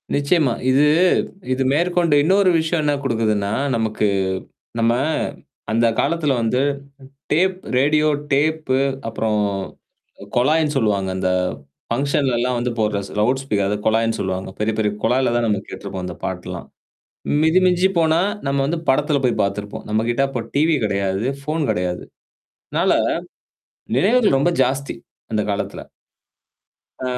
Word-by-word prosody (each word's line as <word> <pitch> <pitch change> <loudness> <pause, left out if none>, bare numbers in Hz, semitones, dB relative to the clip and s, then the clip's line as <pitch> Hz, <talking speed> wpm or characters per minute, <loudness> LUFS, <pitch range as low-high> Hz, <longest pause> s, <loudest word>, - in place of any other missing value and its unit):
நிச்சயமா. 145 -1 +2 0.2
இது 130 +2 +4 0.7
இது 130 +1 +1
மேற்கொண்டு 170 +1 +2
இன்னொரு 190 +4 +4
விஷயம் 160 0 0
என்ன 145 -1 +2
குடுக்குதுன்னா, 110 -5 0 0.2
நமக்கு 110 -2 0 0.7
நம்ம 115 0 +3 0.8
அந்த 115 +1 +3
காலத்துல 150 -1 +1
வந்து 115 +3 +1 0.7
டேப் 185 +4 +2 0.2
ரேடியோ 150 +3 +3 0.2
டேப் 155 +2 +1 0.4
அப்புறம் 110 -1 -1 0.8
அ, - - -7
கொழாய்ன்னு 150 +4 +2
சொல்லுவாங்க. 105 -6 +1
அந்த 95 0 0 0.6
ஃபங்ஷன்லலாம் 125 -1 0
வந்து 120 0 -1
போடுற 105 -2 +1
ஸ் - - -12
லவுட் 130 +5 +1
ஸ்பீக் 105 -7 0
அது 105 +1 0
கொழாய்ன்னு 115 0 +2
சொல்லுவாங்க. 95 0 -3
பெரிய, 110 +1 0
பெரிய 105 -1 +1
கொழால 130 -1 +2
தான் 120 -1 +1
நம்ம 105 -3 0
கேட்ருப்போம். 95 -2 -6
அந்த 90 -2 -7
பாட்டெலெல்லாம். - - -5 0.8
மிதி 160 +3 +4
மிஞ்சிபோனா, 175 -3 +3 0.3
நம்ம 140 0 0
வந்து 165 +3 -1
படத்துல 145 +2 +2
போய் 125 - 0
பாத்துருப்போம். 100 +1 -4
நம்மக்கிட்ட 115 +4 +1
அப்ப 125 -4 -4
டிவி 155 +2 +3
கெடையாது, 100 0 -1 0.2
ஃபோன் 155 +2 -1
கெடையாது. 90 0 -2 0.7
அதனால, - - +2 1.0
நினைவுகள் 210 - +3
ரொம்ப 175 +6 +2
ஜாஸ்தி 135 +1 -2 0.4
அந்த 105 -1 +1
காலத்துல. 100 - -4 1.2
ஆ, - - -4
130 Hz, 130 wpm, -20 LUFS, 110-155 Hz, 1.2 s, இது